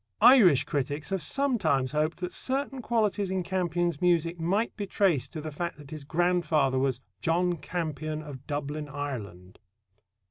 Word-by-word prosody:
Irish 205 - +7
critics 145 +4 -3
have 195 -2 0
sometimes 160 - +1
hoped 155 +4 -1
that 180 0 -3
certain 270 0 -1
qualities 215 -4 0
in 190 -1 -1
Campion's 175 -3 -1
music 170 -1 +2
might 195 +8 0
be 205 -2 -4
traced 185 -9 +1
to 155 - -5
the 155 0 -5
fact 170 +4 -4
that 145 -1 -13
his 155 -2 -7
grandfather 160 -5 +2
was 130 -2 0 0.2
"John 175 +2 +1
Campion 155 -1 -4
of 140 -3 -10
Dublin, 145 0 -4
Ireland." 105 -11 -6
165 Hz, 150 wpm, -28 LUFS, 145-180 Hz, 0.2 s, Irish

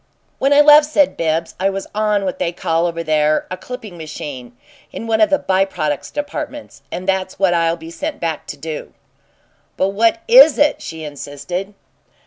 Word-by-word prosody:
"When 275 - +2
I 285 +1 +7
left," 295 0 +7
said 295 -2 +2
Bibbs, 165 0 -1
"I 195 +1 +2
was 195 0 -4
'on' 210 -1 0
what 185 - -3
they 175 -2 0
call 165 0 0
over 165 -1 -4
there 155 -1 +1
a - - -2
'clipping 210 -3 -9
machine,' 130 -6 -8 0.3
in - - -7
one 220 -1 +1
of 215 - +5
the 290 - +3
'by 190 -5 +1
products' 150 -6 -3
departments, 290 - -6
and 185 +1 -5
that's 190 -1 -1
what 190 -2 +2
I'll 165 0 +1
be 165 0 -10
sent 295 - -5
back 165 -3 -3
to." 150 +2 -7 0.8
"But 190 - +1
what 225 +10 +1
is 475 - +8
it?" 295 +1 +2
she 160 -1 -7
insisted. 150 +7 -6
185 Hz, 180 wpm, -18 LUFS, 160-230 Hz, 0.8 s, is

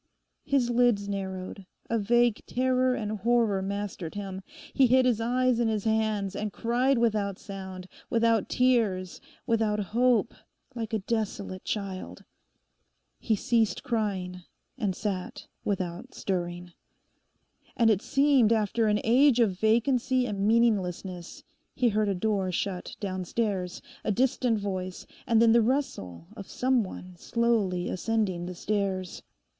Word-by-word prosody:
His 255 -4 +1
lids 240 -4 +2
narrowed; 190 -1 -5 0.2
a 230 - 0
vague 240 +1 +2
terror 255 0 +1
and 215 -2 -3
horror 230 -2 +2
mastered 200 -3 -4
him. 195 -2 -5 0.3
He 270 -2 +5
hid 255 +1 +4
his 235 -3 +2
eyes 250 +1 +2
in 235 - +2
his 215 -2 -1
hands 215 -3 0
and 210 0 -3
cried 245 +5 +1
without 210 -4 +1
sound, 190 -2 -8 0.2
without 230 -2 +2
tears, 220 -8 +1 0.2
without 225 -3 +1
hope, 235 +4 +2 0.4
like 230 -2 -5
a 220 - +1
desolate 205 -4 -3
child. 190 - -5 1.0
He 220 - +1
ceased 225 +1 +1
crying; 195 -6 -2 0.3
and 205 -7 -2
sat 190 -3 -4 0.2
without 180 -3 -3
stirring. 175 -2 -3 1.0
And 230 -2 +5
it 205 -2 +1
seemed 275 -5 +3
after 220 0 +2
an 210 0 +2
age 250 +2 +5
of 195 -6 +2
vacancy 250 +3 +2
and 205 -3 -1
meaninglessness 190 -6 0 0.3
he 250 -2 +3
heard 215 -1 +1
a 195 - 0
door 195 -1 0
shut 180 +1 -3
downstairs, 190 -1 -2 0.2
a - - 0
distant 250 0 +1
voice, 185 -3 -4 0.2
and 230 -2 +4
then 230 0 +6
the 235 +1 +5
rustle 215 - -2
of 195 - -9
some 255 -2 +1
one 185 -1 -9
slowly 210 -5 0
ascending 190 -4 -1
the 180 - -6
stairs. 190 -2 -2
215 Hz, 135 wpm, -28 LUFS, 190-235 Hz, 1.0 s, then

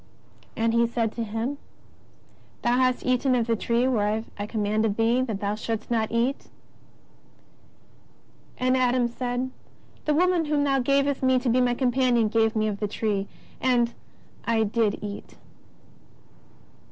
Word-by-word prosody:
And 225 0 +1
He 235 0 +3
said 230 -2 -1
to 230 - -4
him: 225 +6 -3 1.0
Thou 240 - +3
hast 255 -1 +1
eaten 255 +1 +2
of 235 -2 +1
the 230 0 +1
tree 235 +3 +1
whereof 220 -2 0
I 205 0 -5
commanded 215 -1 0
thee 230 +3 +2
that 225 -6 -3
thou 205 0 0
shouldst 220 +1 -4
not 220 -2 0
eat. 240 +4 -1 2.1
And 255 +1 +2
Adam 250 -1 +2
said: 245 +1 -3 0.5
The 300 - +2
woman 355 0 +2
whom 295 -1 +1
Thou 275 -1 +2
gavest 275 +2 +1
me 260 -1 +3
to 250 0 0
be 250 +2 +3
my 245 -1 +2
companion 245 -3 +2
gave 225 +1 +2
me 215 0 +1
of 205 -2 -3
the 210 - -1
tree 200 -1 -2 0.3
and 240 -2 +2 0.5
I 225 -1 +2
did 215 0 0
eat. 205 -1 -7
235 Hz, 150 wpm, -25 LUFS, 220-255 Hz, 2.1 s, He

